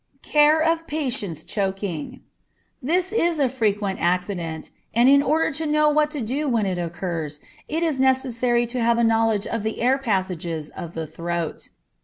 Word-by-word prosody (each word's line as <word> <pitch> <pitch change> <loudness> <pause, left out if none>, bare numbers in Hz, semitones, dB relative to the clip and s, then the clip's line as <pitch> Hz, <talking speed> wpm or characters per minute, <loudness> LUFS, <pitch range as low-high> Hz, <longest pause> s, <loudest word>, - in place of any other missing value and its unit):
Care 300 +1 +4
of 330 0 +1
Patients 230 - -3
Choking. 195 -5 -3 0.6
This 355 +8 0
is 340 -6 +2
a 280 -3 +3
frequent 210 -6 -1
accident, 175 -2 -1 0.2
and 240 +2 +5
in 280 +1 +7
order 315 +3 +1
to 310 +3 -3
know 300 0 +3
what 300 0 +2
to 300 -3 -5
do 270 +7 -2
when 230 -4 +1
it 185 -2 -1
occurs, 165 -3 -4 0.3
it 325 +2 -1
is 310 -5 0
necessary 255 -2 +2
to 240 +1 -3
have 235 0 +3
a 235 - +2
knowledge 225 -2 +2
of 230 - -2
the 220 +1 -3
air 255 +3 +2
passages 180 - -2
of 170 -1 -8
the 160 -1 -3
throat. 170 +1 -4
230 Hz, 170 wpm, -23 LUFS, 180-290 Hz, 0.6 s, in